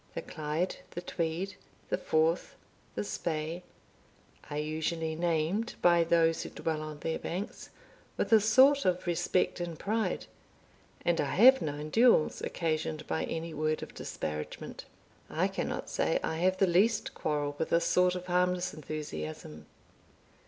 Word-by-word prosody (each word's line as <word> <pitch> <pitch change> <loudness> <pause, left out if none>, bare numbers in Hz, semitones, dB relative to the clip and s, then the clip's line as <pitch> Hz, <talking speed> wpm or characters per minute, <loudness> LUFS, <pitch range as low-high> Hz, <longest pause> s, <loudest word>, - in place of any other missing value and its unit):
The - - -3
Clyde, 155 +4 -2
the 175 - -6
Tweed, 175 +3 -3 0.3
the - - +1
Forth, 160 +2 +1 0.4
the 105 - -1
Spey, 155 - -3 0.9
are 145 - -4
usually 160 +1 -2
named 170 +6 0
by 170 -1 +5
those 165 -1 +3
who - - -5
dwell 160 -2 -3
on 155 -1 -6
their 160 - -2
banks 190 +6 -5 0.5
with - - +1
a 220 - +9
sort 265 +7 +5
of 180 -1 +1
respect 175 +1 +1
and 170 -2 -4
pride, 220 +5 -1 0.8
and 170 -1 +2
I 145 - -2
have 260 +6 +8
known 150 0 -4
duels 230 -9 +4
occasioned 155 -2 -2
by - - -1
any 165 0 -4
word 155 +1 -1
of - - -9
disparagement. 75 0 -5 0.4
I - - +1
cannot - - -3
say - - +1
I 160 - -1
have 185 +2 +2
the 195 - +4
least 200 +5 +2
quarrel 145 -1 -2
with 160 - -1
this 170 - +3
sort 180 0 +3
of 180 0 -5
harmless 180 0 +1
enthusiasm. 80 - -6
165 Hz, 145 wpm, -30 LUFS, 155-180 Hz, 0.9 s, a